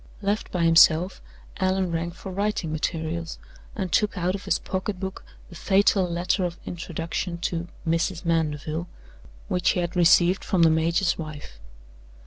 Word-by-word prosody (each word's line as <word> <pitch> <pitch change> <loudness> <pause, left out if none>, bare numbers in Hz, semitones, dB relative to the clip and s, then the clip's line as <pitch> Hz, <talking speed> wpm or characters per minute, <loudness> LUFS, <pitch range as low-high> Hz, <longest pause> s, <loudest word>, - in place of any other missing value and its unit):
Left 205 +2 -1
by 175 -2 0
himself, 165 +2 +5 0.4
Allan 185 -1 0
rang 165 +1 -2
for 180 +2 -9
writing 200 -4 -1
materials, 160 +1 -3 0.4
and 190 -5 -3
took 210 +4 +1
out 180 +1 0
of 200 - -6
his - - +2
pocket 190 0 -4
book 190 0 -5 0.3
the 170 - -12
fatal 195 0 +3
letter 175 +2 0
of 175 -1 -3
introduction 170 +1 -4
to 175 -1 -2 0.2
"Mrs. 165 +2 0
Mandeville" 160 0 -1 0.6
which 180 -1 +1
he - - +1
had 175 0 -2
received 175 +1 +4
from 180 -3 +2
the 165 - +6
major's 170 +4 +1
wife. 150 - -8
175 Hz, 150 wpm, -25 LUFS, 165-185 Hz, 0.6 s, the